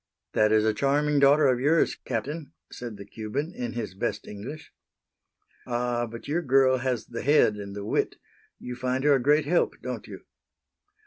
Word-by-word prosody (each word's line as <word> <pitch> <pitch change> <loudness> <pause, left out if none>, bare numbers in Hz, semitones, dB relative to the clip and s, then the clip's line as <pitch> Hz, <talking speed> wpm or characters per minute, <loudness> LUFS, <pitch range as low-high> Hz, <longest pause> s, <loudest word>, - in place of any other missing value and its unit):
"That 110 0 +3
is 110 0 +4
a 110 - +3
charming 145 +4 +2
daughter 140 +2 +5
of 130 -2 +3
yours, 150 +5 +3
Captain," 140 +6 -5 0.2
said 120 -4 -7
the 100 - -9
Cuban, 110 - -4
in 120 -6 -4
his 110 -6 -4
best 95 - -3
English. 125 +10 -8 1.0
"Ah! 120 -1 -1
but 115 +1 -9
your 160 +5 0
girl 130 -3 +4
has 125 -3 -1
the 115 - -6
head 140 -6 +4
and 100 -1 -7
the 100 0 -5
wit. - - 0 0.4
You 125 - -7
find 130 +1 -1
her 145 0 +5
a 135 - +2
great 150 +4 +3
help, 170 +4 +1
don't - - -5
you?" - - -9
125 Hz, 180 wpm, -27 LUFS, 110-145 Hz, 1.0 s, daughter